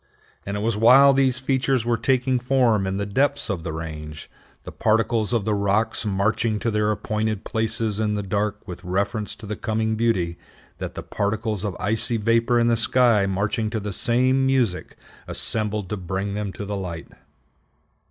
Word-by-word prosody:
And 100 +1 -2
it - - -3
was 115 0 0
while 130 +6 +7
these 130 -2 +2
features 130 -2 0
were 120 0 +2
taking 130 +2 +1
form 120 -6 +2
in 95 0 -2
the 100 - -2
depths 135 +4 0
of 90 -4 -3
the 80 - -4
range, 75 -1 -7 0.3
the - - -8
particles 110 0 +1
of 115 -5 0
the 110 - +1
rocks 105 +3 0
marching 105 +3 0
to 115 +2 -1
their 105 0 +1
appointed 110 0 -2
places 110 -1 -2
in 105 -1 0
the 105 - -2
dark 105 +1 -2
with 90 0 -8
reference 100 +3 -2
to 110 - -11
the 105 +1 -4
coming 110 +1 -1
beauty, 95 -7 0 0.4
that - - -5
the - - -6
particles 105 0 -2
of 100 -4 -3
icy 115 +3 0
vapor 115 +2 +2
in 115 - +3
the 120 0 +3
sky 115 -2 +3
marching 105 +4 -1
to 110 0 -2
the 105 -1 -5
same 130 +5 +2
music 130 -8 0 0.3
assembled 105 -3 -2
to 105 - -3
bring 95 +2 -3
them 105 -1 -3
to 100 - -6
the 100 +1 -4
light. 90 -4 -6
110 Hz, 180 wpm, -23 LUFS, 100-115 Hz, 0.4 s, while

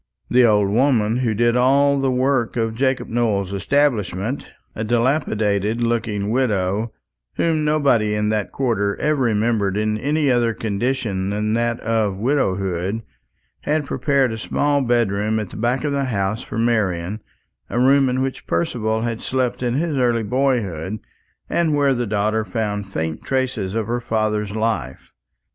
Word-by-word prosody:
The 125 +1 +5
old 105 -4 +4
woman 115 -2 +2
who 120 -4 0
did 120 +2 +2
all 140 +3 +3
the 135 -1 +1
work 130 -2 +1
of 115 -1 0
Jacob 130 +2 0
Nowell's 105 -5 0
establishment 115 0 0 0.2
a 110 - -4
dilapidated 110 -3 +1
looking 110 -3 -1
widow, 110 -3 0 0.4
whom 160 -2 +1
nobody 140 -9 +2
in 105 0 0
that 105 -2 -1
quarter 105 -6 0
ever 150 -2 0
remembered 110 -4 +1
in 110 0 0
any 145 +2 +1
other 120 -2 +1
condition 105 -3 -2
than 105 +1 -1
that 120 0 0
of 110 -3 0
widowhood 100 -5 -1 0.6
had 150 0 -1
prepared 140 -4 +1
a 110 - -6
small 145 +5 +1
bedroom 110 -3 +1
at 105 -4 -5
the - - -10
back 120 +5 0
of 145 - 0
the 140 -1 0
house 105 -2 -1
for - - -7
Marian; 105 -4 0 0.5
a 120 - -1
room 135 +1 +4
in 130 +1 0
which 135 -1 -5
Percival 110 +6 -1
had 115 -1 -3
slept 130 -2 -1
in 120 -1 0
his 160 +1 0
early 120 -3 +2
boyhood, 110 - -1 0.5
and 160 -3 +1
where 140 -2 +3
the 120 -2 -2
daughter 110 +1 0
found 105 -1 -3
faint 80 -3 -3
traces 125 -7 -1
of 115 -1 0
her 120 +2 -2
father's 110 -2 -1
life. 110 - -3
115 Hz, 155 wpm, -21 LUFS, 105-130 Hz, 0.6 s, The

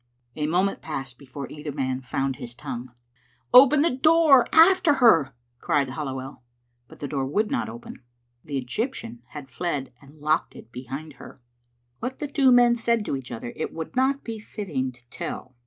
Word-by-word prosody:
A 150 -1 -1
moment 185 +5 0
passed 135 -5 -6
before 140 0 -8
either 150 0 -6
man 130 -2 -2
found 135 +1 -2
his 120 -1 -8
tongue. 120 0 -7 0.6
"Open 275 +3 +8
the 335 - +2
door. 310 -3 +5
After 335 -2 +6
her!" 165 - +4 0.2
cried 140 0 0
Halliwell. 135 -2 -6 0.5
But - - -16
the 145 - -3
door 135 -2 -2
would 210 - 0
not 270 - -1
open. 235 - -10 0.4
The 145 -2 -4
Egyptian 125 - -4
had 135 -1 -10
fled 145 -5 -3
and 145 +2 -18
locked 155 +2 0
it 115 - -13
behind 135 +5 -7
her. - - -12 0.6
What 255 +3 -4
the 295 - -4
two 275 -2 +3
men 245 -1 +6
said 230 -2 0
to - - -2
each 135 -2 -7
other, 120 0 -6
it 155 - -4
would 160 +6 -6
not 265 +2 +1
be 225 -2 -6
fitting 165 -12 -4
to 120 -1 -22
tell. 130 +1 -6
150 Hz, 175 wpm, -25 LUFS, -, 0.6 s, Open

